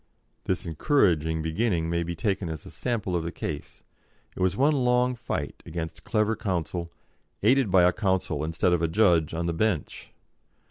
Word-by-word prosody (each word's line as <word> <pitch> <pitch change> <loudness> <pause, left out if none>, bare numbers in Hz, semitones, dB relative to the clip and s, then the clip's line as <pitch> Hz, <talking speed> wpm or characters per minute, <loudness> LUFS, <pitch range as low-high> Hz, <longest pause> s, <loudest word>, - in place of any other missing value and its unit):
This 95 -1 -1
encouraging 80 - +2
beginning 80 0 0
may 85 0 0
be 85 0 -3
taken 95 0 -1
as 80 -2 -6
a - - -10
sample 110 -7 -2
of 85 - 0
the 85 - -3
case 75 -4 -6 0.5
it - - -9
was 90 -1 +1
one 145 +4 +4
long 125 -2 +2
fight 115 - -4
against 80 -1 -6
clever 110 0 +1
counsel, 85 -5 -3 0.5
aided 125 +1 +4
by 90 -1 +5
a 90 0 +4
counsel 95 -7 0
instead 80 +3 +1
of 85 - +1
a 85 - +2
judge 85 -4 +3
on 85 +1 -2
the 85 - 0
bench. 90 -3 -2
90 Hz, 175 wpm, -26 LUFS, 80-110 Hz, 0.5 s, by